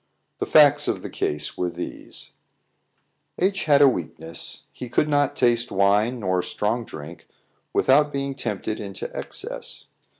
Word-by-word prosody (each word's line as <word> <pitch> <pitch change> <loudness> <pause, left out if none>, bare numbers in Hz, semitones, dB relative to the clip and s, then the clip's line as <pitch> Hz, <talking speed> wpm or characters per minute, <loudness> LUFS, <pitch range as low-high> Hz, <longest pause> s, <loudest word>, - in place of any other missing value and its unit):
The - - -2
facts 145 -1 +6
of - - -1
the - - -6
case 75 0 -3
were 90 - +1
these: 85 +1 -7 1.1
H 195 +2 +1
had 145 -2 +6
a - - +9
weakness; 85 -7 -3
he 125 - -7
could 135 +5 +2
not 145 -2 +2
taste 120 -1 +2
wine 105 +5 +2
nor 95 -2 +1
strong 110 +6 -2
drink 80 0 -10 0.4
without 145 +2 +4
being 140 -1 -2
tempted 110 -4 -3
into 100 -2 -6
excess. - - -6
120 Hz, 140 wpm, -24 LUFS, 95-140 Hz, 1.1 s, a